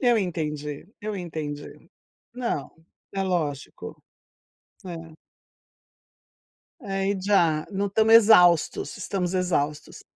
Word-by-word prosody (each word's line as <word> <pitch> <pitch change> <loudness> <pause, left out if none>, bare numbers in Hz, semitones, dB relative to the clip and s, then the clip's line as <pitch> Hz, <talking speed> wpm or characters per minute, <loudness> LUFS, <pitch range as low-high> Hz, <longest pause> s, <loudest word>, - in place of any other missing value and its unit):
Eu 240 -3 +4
entendi, 150 -5 -4
eu 210 -1 -4
entendi. 155 -5 -7 0.4
Não, 235 - -3 0.4
é 195 -1 -1
lógico. 160 -7 -3 0.8
É. 165 -3 -9 1.6
Aí 195 -3 -2
já 170 -6 +2
não 200 +1 0
estamos 220 +3 +4
exaustos 180 -7 +5
estamos 185 -2 -3
exaustos. 150 -5 -2
180 Hz, 90 wpm, -25 LUFS, 155-200 Hz, 1.6 s, exaustos